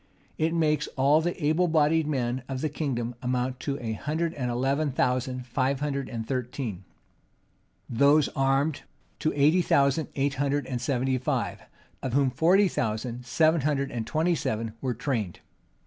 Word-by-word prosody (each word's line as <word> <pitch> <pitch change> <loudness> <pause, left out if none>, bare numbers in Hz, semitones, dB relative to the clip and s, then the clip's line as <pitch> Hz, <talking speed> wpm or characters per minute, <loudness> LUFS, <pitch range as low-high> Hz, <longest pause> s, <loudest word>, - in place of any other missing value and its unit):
It 165 +1 +1
makes 155 -2 +1
all 140 +4 +4
the 175 +2 -2
able 160 +4 +3
bodied 160 -1 +3
men 130 -3 -1
of 130 -1 -3
the 155 - 0
kingdom 125 -5 -2
amount 125 0 -1
to 140 0 -3
a 115 -2 -3
hundred 160 +8 -2
and 125 -5 -3
eleven 135 +5 0
thousand 125 0 0
five 130 +2 0
hundred 140 -2 -2
and 115 -2 -5
thirteen; 125 -6 -3 1.0
those 140 +5 +4
armed, 135 +2 +1 0.4
to 155 - +1
eighty 150 +5 +4
thousand 140 -1 +2
eight 140 0 +1
hundred 145 0 0
and 125 -2 -4
seventy 130 0 0
five; 125 - -2 0.4
of 130 - -3
whom 135 -1 +3
forty 180 +9 +4
four - - -6
thousand 115 +3 -2
seven 160 +5 +3
hundred 140 -1 0
and 115 -2 -4
twenty 165 +3 +1
seven 115 -7 -2
were 130 -3 -1
trained. 110 -11 -2
135 Hz, 165 wpm, -27 LUFS, 125-150 Hz, 1.0 s, all